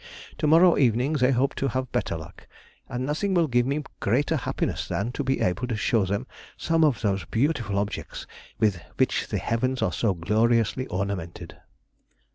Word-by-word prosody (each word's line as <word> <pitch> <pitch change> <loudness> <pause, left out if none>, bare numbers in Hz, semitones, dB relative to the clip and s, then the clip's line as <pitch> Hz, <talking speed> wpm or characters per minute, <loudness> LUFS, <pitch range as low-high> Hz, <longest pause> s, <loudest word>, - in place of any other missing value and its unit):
To 155 - +1
morrow 170 +3 +6
evening 125 +2 +2
they 130 -4 +3
hope 135 +1 +2
to 135 - 0
have 130 0 -3
better 120 -8 -1
luck, 80 -1 -12 0.4
and 125 0 -3
nothing 185 +7 -1
will 170 -2 +4
give 120 -2 +2
me 145 +2 -1 0.2
greater 125 +8 +1
happiness - - -2
than 105 +5 -2
to 145 - -3
be 135 0 0
able 105 +8 0
to 120 - -2
show 105 -1 +1
them 100 +1 -2 0.3
some 165 0 +1
of 145 -6 +2
those 100 -5 0
beautiful 120 - 0
objects 100 +1 -4 0.3
with 105 -6 +1 0.2
which - - +1
the - - -2
heavens 130 +3 -1
are - - 0
so 105 -5 +1
gloriously 115 +7 +1
ornamented. 90 -2 -4
120 Hz, 175 wpm, -25 LUFS, 100-140 Hz, 0.4 s, morrow